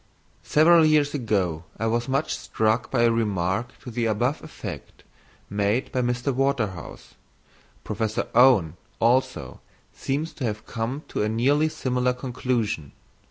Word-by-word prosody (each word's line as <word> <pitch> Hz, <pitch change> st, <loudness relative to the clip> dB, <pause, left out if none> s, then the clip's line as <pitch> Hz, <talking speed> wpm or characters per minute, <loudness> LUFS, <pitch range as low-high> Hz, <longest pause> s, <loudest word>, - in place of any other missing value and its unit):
_ -, -, -36 dB, 0.4 s
Several 165 Hz, +2 st, +5 dB
years 155 Hz, -2 st, +3 dB
ago 100 Hz, -, -1 dB
I 110 Hz, -, -2 dB
was 120 Hz, +2 st, 0 dB
much 135 Hz, +3 st, 0 dB
struck 110 Hz, +2 st, 0 dB
by 120 Hz, -3 st, +2 dB
a 115 Hz, -, +5 dB
remark 105 Hz, +1 st, -1 dB
to 125 Hz, -, -7 dB
the 115 Hz, 0 st, -1 dB
above 120 Hz, +7 st, 0 dB
effect 155 Hz, -, -9 dB, 0.4 s
made 105 Hz, +5 st, 0 dB
by 130 Hz, -, 0 dB
Mr. 125 Hz, +2 st, -1 dB
Waterhouse. 120 Hz, -, -2 dB, 0.7 s
Professor 110 Hz, -1 st, -2 dB
Owen, 105 Hz, -, +5 dB, 0.2 s
also, 125 Hz, +3 st, +1 dB, 0.3 s
seems 145 Hz, +4 st, -3 dB
to 140 Hz, -, -7 dB
have 110 Hz, -2 st, -3 dB
come 120 Hz, +6 st, -4 dB
to -, -, -2 dB
a 105 Hz, -, +1 dB
nearly 140 Hz, +8 st, +2 dB
similar 125 Hz, -3 st, 0 dB
conclusion. 120 Hz, -, -2 dB
120 Hz, 140 wpm, -25 LUFS, 110-135 Hz, 0.7 s, Several